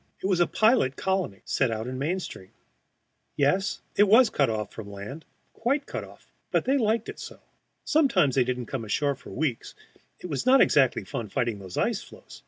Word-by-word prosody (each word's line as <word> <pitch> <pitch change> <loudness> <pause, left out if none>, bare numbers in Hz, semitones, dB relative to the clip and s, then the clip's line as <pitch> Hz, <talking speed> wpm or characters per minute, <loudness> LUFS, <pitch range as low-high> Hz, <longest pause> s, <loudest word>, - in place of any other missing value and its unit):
It - - -2
was 190 -2 +2
a 175 - +4
pilot 215 - +3
colony, 190 - -2
set 135 - +1
out 110 0 -3
in 130 +1 -5
midstream. 155 - -4 0.9
Yes, 185 +8 +1
it 205 - +5
was 230 +4 +6
cut 140 -4 +2
off 105 -2 -3
from 110 -2 -8
the 100 - -10
land, 120 +11 -8 0.3
quite 275 +5 -1
cut - - -5
off; - - -16 0.2
they 270 - +1
liked 220 -1 +1
it - - -8
so. - - -9 0.5
Sometimes 225 - +3
they 130 - +3
didn't 125 0 -3
come 130 0 -4
ashore 140 +7 0
for 135 - -13
weeks; 135 -5 -3 0.4
it - - -11
was 145 -5 -2
not 260 +2 +5
exactly 135 - +4
fun 120 -7 -5
fighting 115 0 -1
those 95 -2 -9
ice - - 0
floes. - - -14
140 Hz, 190 wpm, -26 LUFS, 120-200 Hz, 0.9 s, was